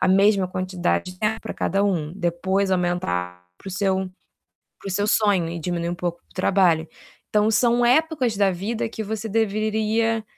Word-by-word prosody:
a 185 - +2
mesma 195 0 +4
quantidade 185 - -2
de 180 - -19
tempo 220 +2 0
para - - -6
cada 195 +1 0
um, 165 -6 -1
depois 190 +2 0
aumentar 90 - -1
para - - -9
o - - -5
seu 190 0 0 0.7
para - - -9
o - - -3
seu 205 +2 0
sonho 200 -6 +2
e 170 0 -5
diminuir 170 +1 -2
um 175 - -3
pouco 175 -1 -3
o - - -27
trabalho. 180 -4 +2 0.4
Então 210 +1 +2
são 240 +1 +3
épocas 260 -4 +2
da 200 -1 +4
vida 215 +6 -3
que 220 -1 -5
você 220 +1 -4
deveria 220 +1 0
195 Hz, 180 wpm, -23 LUFS, 175-215 Hz, 0.7 s, mesma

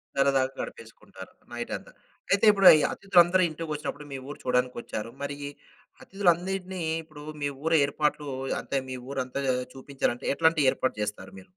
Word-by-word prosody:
సరదాగా 135 -1 +3
గడిపేసుకుంటారు 110 -4 -10 0.2
నైటంతా. 120 0 -5 0.4
అయితే 200 +2 +4
ఇప్పు‌డు 195 -2 +5
ఈ - - +1
అతిథులందరూ 185 -1 +4
ఇంటికొచ్చినప్పుడు 150 -2 -5
మీ 135 - -4
ఊరు 145 - -7
చూడడానికి 125 0 +1
వచ్చారు. 110 +2 -5
మరి 140 0 -4 0.7
అతిథులన్నిటిని 185 0 0 0.2
ఇప్పుడు 155 -2 -13 0.2
మీ 145 - +1 0.2
ఊరు 165 0 +3
ఏర్పాట్లు 150 +1 -1 0.3
అంటే 140 - -2
మీ 130 - -4 0.2
ఊరంతా 135 0 -3 0.3
చూపించాలంటే 135 -2 -3
ఎట్లాంటి 160 -2 +3
ఏర్పాట్లు 130 -4 -2
చేస్తారు 100 -2 -6
మీరు? 95 - -16
145 Hz, 135 wpm, -27 LUFS, 130-170 Hz, 0.7 s, ఇప్పు‌డు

